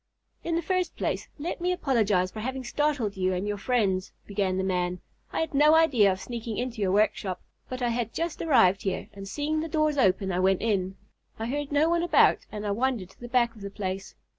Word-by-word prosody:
"In 335 - -1
the 340 - 0
first 370 -2 -1
place, - - -2
let 335 +4 -4
me 360 +1 +1
apologize 215 - +1
for 220 - -7
having 260 +3 -3
startled 270 -5 0
you 185 -1 0
and 185 +3 -2
your 205 -1 -2
friends," 195 -5 0
began 195 -2 -1
the 190 - 0
man. 180 -1 -1 0.3
"I - - -1
had 320 -2 -3
no 300 +3 +6
idea 265 -12 +5
of 185 - -3
sneaking 230 -1 -5
into 245 -3 -3
your 190 -2 +2
workshop, 195 -2 +1 0.3
but 255 0 -4
I 240 - +2
had 230 -1 -1
just 335 -1 -3
arrived 200 - +4
here, 190 -2 -3
and 195 -1 -8
seeing 295 +9 -1
the 320 - -2
doors 305 -1 +1
open 190 -3 +2
I 180 - 0
went 190 +1 +2
in. 195 -4 0 0.4
I 225 - -3
heard 285 +4 -3
no 290 +2 +3
one 340 0 +2
about, 345 - +4
and 210 0 -5
I 205 - 0
wandered 225 -4 -1
to - - -24
the 240 - -8
back 240 -2 +2
of 215 - -13
the 200 - -5
place. 195 -1 -5
225 Hz, 225 wpm, -27 LUFS, 195-290 Hz, 0.4 s, no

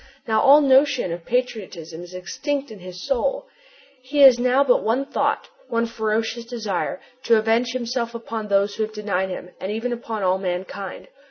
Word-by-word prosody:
Now 220 -1 +2
all 285 +2 +7
notion 270 - +3
of 170 0 -9
patriotism 190 -10 -3
is 175 +1 -10
extinct 280 - -3
in 210 - -10
his 180 0 -9
soul. 275 - 0 0.6
He 285 +3 0
has 260 -3 +9
now 255 +3 +3
but 255 -3 +3
one 245 +5 +1
thought, - - -1 0.2
one 230 0 0
ferocious 225 +1 -2
desire: 215 -6 -3 0.3
to 230 -1 +5
avenge 225 +2 +2
himself 240 -1 -2
upon 225 -2 -5
those 200 0 +2
who - - -4
have 215 0 -5
denied 200 -3 -1
him 180 -1 -7
and 190 - -4
even 230 +3 -2
upon 225 -3 -5
all 185 0 +2
mankind! 190 +1 -5
225 Hz, 175 wpm, -23 LUFS, 195-250 Hz, 0.6 s, has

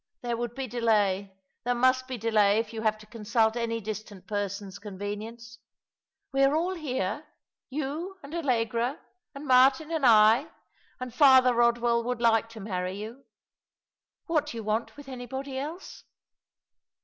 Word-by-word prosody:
There 240 -1 -1
would 240 0 -4
be 270 - -3
delay. 210 -5 +1 0.3
There 245 0 0
must 255 +1 +2
be 260 -1 -4
delay 215 -2 +3
if 225 0 -2
you 220 - -4
have 215 -1 +1
to 215 - -15
consult 220 0 0
any 230 -1 -2
distant 210 -3 -7
person's 200 -2 -4
convenience. 215 +3 -7 0.7
We 270 0 +1
are 275 +2 +4
all 350 +4 0
here 290 - -3 0.2
— - - -66
you 305 +7 -4
and 280 +2 -10
Allegra, 245 -4 0 0.4
and 280 +2 -8
Martin 265 +4 +4
and 320 -3 -1
I 225 +3 +6 0.3
— - - -35
and 255 -2 -6
Father 260 -2 +6
Rodwell 235 0 +2
would 250 0 -2
like 225 -1 +3
to 225 -1 -11
marry 185 -2 -3
you. 225 +6 -8 1.0
What 310 -5 0
do 235 - -6
you 225 - -5
want 215 +5 -2
with 290 -1 -11
anybody 265 +1 -6
else 315 +7 -7
235 Hz, 160 wpm, -28 LUFS, 215-265 Hz, 1.0 s, I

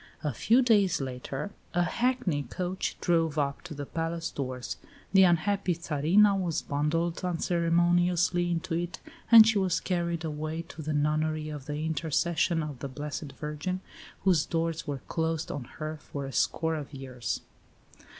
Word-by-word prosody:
A 150 -3 -1
few 235 - +4
days 205 -7 +4
later 135 +7 -4 0.2
a 175 - +4
hackney 200 - 0
coach 180 +8 -3
drove 165 -3 +2
up 140 -1 0
to 175 -3 -8
the 145 0 -5
palace 165 +2 -3
doors; 130 -2 -4 0.4
the 195 - +7
unhappy 185 +1 +3
Tsarina 170 +6 +3
was 175 -4 -1
bundled 165 +5 -1
unceremoniously 175 0 +2
into 165 -1 -2
it, 175 +1 -2 0.3
and 225 -2 +11
she 220 -2 +3
was 185 -3 +1
carried 170 -2 -1
away 155 +1 -3
to 160 - -8
the 155 0 -2
nunnery 155 +1 0
of 145 -2 -7
the 150 +1 -3
"Intercession 160 +1 +1
of 145 -4 -6
the 140 - -5
Blessed 145 +1 -5
Virgin," 150 +6 -3 0.4
whose 180 -5 +4
doors 165 0 -2
were 140 -3 -4
closed 160 -1 -1
on 140 -4 -5
her 155 0 -4
for 140 -1 -6
a 135 - -7
score 160 0 +1
of 150 -2 -5
years. 130 -3 -4
165 Hz, 155 wpm, -29 LUFS, 150-175 Hz, 0.4 s, and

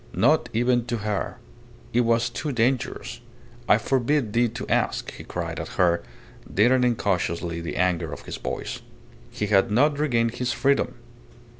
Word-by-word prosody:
Not 155 +6 +3
even 120 +1 +2
to 120 - -1
her. 105 -1 -3 0.6
It 120 - +4
was 115 0 +2
too 145 +4 -3
dangerous. 125 +1 -1 0.5
"I - - +7
forbid 130 -3 0
thee 120 +1 +3
to 115 +2 -6
ask," - - 0
he - - -10
cried - - -4
at - - -4
her, 85 -2 +3 0.5
deadening 125 +3 +4
cautiously 85 -4 -1
the 85 - -5
anger 90 -3 +1
of 75 - -8
his - - -6
voice. - - -4 0.5
He 105 - -3
had 100 -2 +3
not 145 +7 +3
regained 115 -6 +2
his 125 -1 -1
freedom. 140 0 +1
115 Hz, 155 wpm, -25 LUFS, 100-125 Hz, 0.6 s, I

